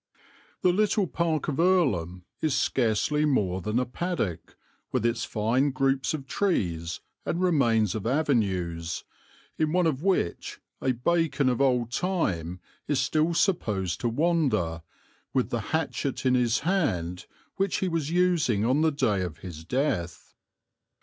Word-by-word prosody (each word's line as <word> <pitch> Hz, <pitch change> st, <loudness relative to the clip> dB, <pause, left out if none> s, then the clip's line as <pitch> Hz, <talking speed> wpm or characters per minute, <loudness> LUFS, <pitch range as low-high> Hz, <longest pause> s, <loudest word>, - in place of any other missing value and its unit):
"The 180 Hz, -, +4 dB
little 205 Hz, 0 st, +2 dB
park 165 Hz, -3 st, -1 dB
of 145 Hz, -1 st, -2 dB
Earlham 105 Hz, -, +2 dB, 0.2 s
is 155 Hz, -4 st, +1 dB
scarcely 130 Hz, +5 st, +1 dB
more 100 Hz, -11 st, +1 dB
than 105 Hz, +5 st, -1 dB
a 125 Hz, -, +2 dB
paddock, 125 Hz, -, -3 dB, 0.3 s
with 125 Hz, -3 st, 0 dB
its 115 Hz, 0 st, 0 dB
fine 120 Hz, +6 st, +1 dB
groups 135 Hz, +2 st, 0 dB
of 140 Hz, -3 st, -7 dB
trees 85 Hz, -, -1 dB, 0.2 s
and 170 Hz, -, -2 dB
remains 120 Hz, -, +2 dB
of 110 Hz, 0 st, -3 dB
avenues, 95 Hz, -, 0 dB, 0.6 s
in 155 Hz, 0 st, +1 dB
one 180 Hz, -1 st, +3 dB
of 150 Hz, -4 st, 0 dB
which 185 Hz, -, -1 dB, 0.2 s
a 130 Hz, -, +1 dB
Bacon 140 Hz, +1 st, +1 dB
of 125 Hz, +1 st, 0 dB
old 125 Hz, -3 st, +2 dB
time 95 Hz, -, -1 dB, 0.3 s
is 145 Hz, -2 st, +1 dB
still 155 Hz, +5 st, +1 dB
supposed 105 Hz, -, 0 dB
to 120 Hz, -, +1 dB
wander, 130 Hz, -, +1 dB, 0.5 s
with 130 Hz, -, +1 dB
the 120 Hz, -, 0 dB
hatchet 140 Hz, -4 st, -2 dB
in 130 Hz, -, +4 dB
his 120 Hz, -2 st, +2 dB
hand 95 Hz, -, -1 dB, 0.3 s
which 195 Hz, -1 st, +1 dB
he 190 Hz, -, 0 dB
was 165 Hz, -4 st, -1 dB
using 170 Hz, -, +2 dB
on 130 Hz, +5 st, +2 dB
the 160 Hz, 0 st, +3 dB
day 105 Hz, -9 st, +1 dB
of 85 Hz, -4 st, -4 dB
his 80 Hz, -3 st, -8 dB
death. 90 Hz, -, -2 dB
130 Hz, 145 wpm, -27 LUFS, 105-160 Hz, 0.6 s, The